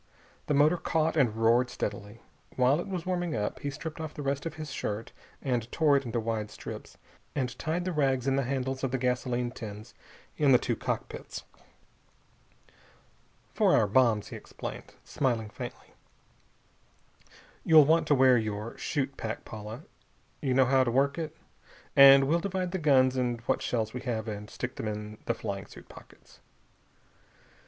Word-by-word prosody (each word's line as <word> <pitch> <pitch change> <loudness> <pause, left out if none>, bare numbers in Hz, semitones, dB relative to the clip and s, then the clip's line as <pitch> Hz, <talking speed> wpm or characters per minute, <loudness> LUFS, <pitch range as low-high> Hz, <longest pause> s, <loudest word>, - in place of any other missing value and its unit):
The 150 - +1
motor 150 +5 +4
caught 160 -1 0
and 125 -8 +2
roared 115 +3 +3
steadily. 105 0 -5 0.3
While 130 +4 +3
it 175 - -4
was 185 -4 -4
warming 175 -4 -1
up, 105 -1 -2
he 145 - -3
stripped 155 +3 -6
off 155 -1 -6
the 145 - -5
rest 140 +3 -1
of 160 - -7
his 155 -2 -7
shirt 110 -4 -4 0.3
and 120 -3 -1
tore 150 -3 +3
it 140 -1 +1
into 115 0 -2
wide 110 -2 -2
strips, 105 - -9 0.4
and 125 -3 -2
tied 170 +3 -2
the 185 - -1
rags 135 -5 +1
in 135 -1 +2
the 140 - +2
handles 130 0 -2
of 135 - +1
the 130 - -1
gasoline 125 -1 -1
tins 110 -2 -9 0.4
in 145 -3 +4
the - - +8
two - - -1
cockpits. - - -5 2.1
"For - - +4
our 110 - +4
bombs," 110 -1 +2
he - - -7
explained, - - -8
smiling 115 -6 -1
faintly. - - -9 1.7
"You'll 155 -3 +7
want 165 +3 +3
to 145 - +4
wear 130 -2 +5
your 110 +1 -4
chute 140 -3 -2
pack, 110 0 -5
Paula. 110 +1 -8 0.6
You 130 -2 0
know 130 0 +5
how 130 +1 +4
to 125 - -1
work 140 +5 +1
it? 160 -1 -5 0.6
And 135 0 +9
we'll 155 +5 +2
divide 185 -1 -2
the 190 - -2
guns 130 -4 +4
and 120 -2 0
what - - 0
shells 110 -2 -1
we 125 - -5
have, 115 -3 -3
and 105 -1 -6
stick - - -5
them - - -3
in 105 0 -5
the - - +1
flying - - -5
suit - - -14
pockets." - - -16
130 Hz, 170 wpm, -29 LUFS, 115-150 Hz, 2.1 s, And